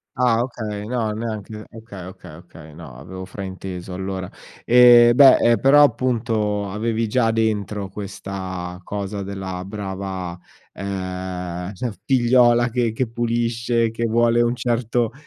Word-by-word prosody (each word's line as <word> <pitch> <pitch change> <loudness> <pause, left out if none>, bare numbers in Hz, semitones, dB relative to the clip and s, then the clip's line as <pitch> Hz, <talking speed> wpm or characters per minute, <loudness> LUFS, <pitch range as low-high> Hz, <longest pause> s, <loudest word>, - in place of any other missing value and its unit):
Ah, 120 -2 +2
okay, 110 -4 -5
no 115 -1 -2
neanche 110 -1 -6
okay, 110 -5 -10
okay, 90 -3 -11
okay, 80 -2 -14
no, 80 -7 -11
avevo 95 +7 -9
frainteso 95 -1 -7
allora. 95 -1 -5 0.3
E 120 -1 +7
beh, 135 0 +8
ehm, 115 -3 +3
però 140 +2 +6
appunto 115 -6 +1
avevi 110 +3 -1
già 115 +1 +2
dentro 105 -3 -1
questa 95 -3 -6
cosa 100 0 -5
della 95 -2 -6
brava 95 -3 -5 0.4
ehm, 90 -1 -5
cioè 120 +5 -4
figliola 120 -1 +4
che 120 -1 0
che 120 +3 -2
pulisce, 115 0 0
che 115 +1 -3
vuole 120 +1 +3
un 120 +1 0
certo 120 -1 -1
105 Hz, 130 wpm, -21 LUFS, 95-120 Hz, 0.4 s, beh